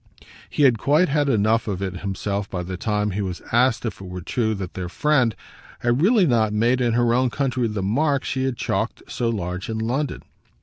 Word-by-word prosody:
He 150 - 0
had 125 -5 +5
quite 150 - +3
had 145 0 +1
enough 110 -1 +2
of 100 -3 -2
it 95 -2 -3
himself 100 +1 -3
by 90 -2 -3
the 90 +1 -5
time 105 +2 -1
he 100 +3 -2
was 90 -3 -4
asked 120 +1 +3
if 105 -4 -4
it 95 - -8
were 90 0 -6
true 110 0 0
that 95 -3 -6
their 90 -2 -5
friend 130 -2 +2 0.5
had 120 +3 +1
really 205 +1 +5
not 110 -7 +2
made 120 +4 +2
in 120 -2 +2
her 120 0 +3
own 125 +1 +2
country 130 -2 0
the 105 -3 -3
mark 140 +7 +1
she 130 0 -1
had 130 -2 -2
chalked - - -2
so 120 - -1
large 90 -3 -3
in 110 - -2
London. 125 +6 -2
115 Hz, 215 wpm, -23 LUFS, 100-130 Hz, 0.5 s, had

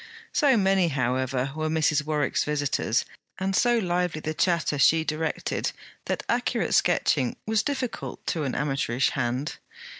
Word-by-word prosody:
So 275 -5 +4
many, 190 -3 +3
however, 130 -1 -1
were 155 0 -1
Mrs. 155 -1 +2
Warwick's 150 -3 0
visitors, 145 -6 0 0.3
and 190 0 -1
so 240 +2 +3
lively 180 -5 0
the 155 0 -3
chatter 165 -4 +1
she 160 +3 +5
directed, 155 0 -2 0.3
that - - -2
accurate - - 0
sketching 125 -2 +2
was 220 -1 +2
difficult 260 -3 -4
to 165 - -1
an 135 - -2
amateurish 135 -3 0
hand. 130 +4 -2
155 Hz, 140 wpm, -26 LUFS, 135-180 Hz, 0.3 s, she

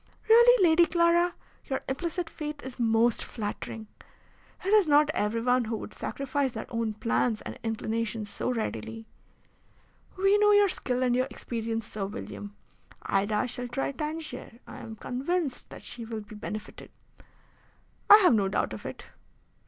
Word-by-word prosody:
"Really, 470 -3 +7
Lady 335 +1 +5
Clara, 340 +1 +3 0.3
your 265 - -2
implicit 340 +5 -2
faith 300 -2 -6
is 260 -1 -9
most 230 0 +3
flattering. 220 0 -5 0.8
It - - 0
is 420 -5 +6
not 295 +1 +5
everyone 230 +3 +1
who 220 0 -2
would - - -8
sacrifice 275 -1 -2
their 220 - -5
own 230 -2 -2
plans 230 0 0
and - - -8
inclinations 225 -1 -2
so 205 - -3
readily." 225 -1 -4 1.1
"We 390 +2 +4
know 415 0 +5
your 410 -1 +5
skill 255 -7 -1
and 245 -1 +2
your 255 +1 +1
experience, 230 -3 -4
Sir 205 -2 -4
William. 205 0 -8 0.5
Ida 205 +3 +1
shall 245 0 -4
try 255 +3 -2
Tangier. 300 -5 -6
I - - -10
am 225 -1 -8
convinced 270 +5 -2
that - - -11
she 240 - -6
will 225 -1 -5
be 210 +1 -13
benefited." 215 0 -7 1.2
"I 415 - +12
have 360 - +6
no 200 -3 +3
doubt 190 - -1
of 110 - -7
it." - - -8
245 Hz, 150 wpm, -28 LUFS, 225-315 Hz, 1.2 s, I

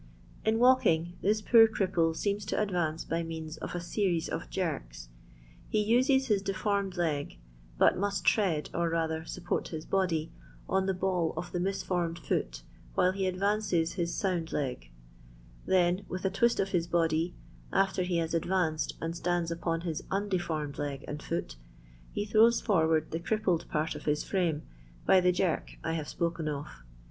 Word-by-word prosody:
In 220 +1 +2
walking 200 -10 +4
this 215 +2 +2
poor 225 0 +7
cripple 180 -6 +1
seems 205 +3 -1
to 200 - -2
adTance 175 -6 -1
by 165 +1 0
means 160 -1 -6
of - - -6
a - - -1
series 175 -1 0
of - - -4
jerks. - - -4 0.6
He 215 - +1
uses 255 +5 +3
his 210 -6 +2
defi»rm«d 195 -1 -1
leg, 150 - -1 0.4
but - - +4
must 200 -3 -1
tread, 170 -6 +2
or 170 0 +1
rather 160 -1 -1
support 175 +1 -3
his 160 -1 -6
body, 175 -5 0 0.4
on 190 0 +1
the 190 - +1
ball 180 -3 0
of 175 - -4
the 175 - -2
misformed 175 -2 -1
foot, - - -2 0.3
while 180 +1 +3
be 190 -1 0
adtances 190 -3 +1
his 170 -3 -1
sound 175 -4 -1
leg; 125 - -3 0.8
then, 180 +1 +3
with 185 +1 -4
a 190 - +2
twist 235 +5 +2
of 195 0 0
bis 175 -2 +1
body, 165 0 +1 0.4
after 195 -1 +2
he 180 -1 0
has 165 -1 -1
adranced 165 -2 0
and 165 +1 -3
stands 175 -1 -1
upon 165 0 -1
his 165 -3 -3
undefbrmed 175 -7 -2
leg 140 -1 -4
and 150 0 -5
foot, 165 - -4 0.5
he 205 - -2
throws 225 +3 +5
forward 160 -6 +2
the 165 - -2
crippled 185 -2 0
part 155 +2 -1
of - - -9
his 150 0 +1
frame 170 -6 0 0.4
by 185 - +6
the 180 0 +4
jerk 180 -2 -1
I 160 - -1
hare 160 -2 -2
spoken 170 0 -2
of. 145 -1 -3
175 Hz, 170 wpm, -30 LUFS, 160-195 Hz, 0.8 s, poor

